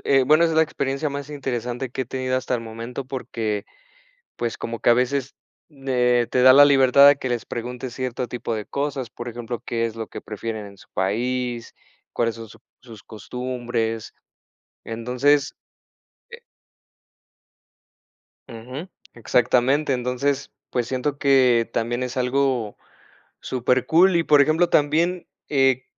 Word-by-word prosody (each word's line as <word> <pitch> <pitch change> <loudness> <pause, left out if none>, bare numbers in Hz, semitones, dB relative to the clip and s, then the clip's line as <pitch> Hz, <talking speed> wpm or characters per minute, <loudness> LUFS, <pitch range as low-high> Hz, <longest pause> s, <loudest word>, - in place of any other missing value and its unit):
eh, 135 -1 +4
bueno, 155 +5 +5
esa 165 - +1
es 160 - -1
la 160 - +6
experiencia 140 0 -2
más 140 0 -6
interesante 125 -3 -4
que 130 +2 -3
he - - -6
tenido 130 +1 -2
hasta 130 0 -2
el 120 - -2
momento, 115 +3 -7
porque, 110 -6 -3 0.7
pues, 120 -2 -3
como 115 -1 -5
que - - +4
a - - +7
veces, 130 +2 -1 0.5
eh, 125 -2 +2
te 125 - +2
da 130 0 +9
la 145 +1 +8
libertad 140 0 +6
de 145 - +6
que 130 -2 -4
les 120 -2 -2
preguntes 125 +1 -6
cierto 125 -1 -3
tipo 120 -1 -4
de 105 -1 -5
cosas, 140 -3 -3
por 120 - -9
ejemplo, 120 0 -6
¿qué 115 -1 -1
es 115 0 -7
lo 110 - -5
que - - -9
prefieren 110 0 -6
en 100 0 -13
su - - -18
país? 120 +4 -2 0.4
¿Cuáles 115 -1 0
son 115 -1 -9
su - - -15 0.2
sus 115 -4 -13
costumbres? 120 0 -4 0.7
Entonces, 125 +5 0 0.7
eh 470 0 -12 2.1
Ujú, 125 +8 -8 0.3
exactamente. 125 +5 +2
Entonces, 130 +2 -1 0.2
pues 120 -2 -1
siento 135 +2 -2
que 130 -5 +4
también 120 +2 -1
es 125 0 -4
algo 125 -3 0 0.6
supercool, 130 +9 +2
y, 170 - +3
por 150 -3 +5
ejemplo, 160 +4 +3
también, 165 +4 +1 0.2
eh, 135 -3 +2
125 Hz, 150 wpm, -23 LUFS, 120-140 Hz, 2.1 s, da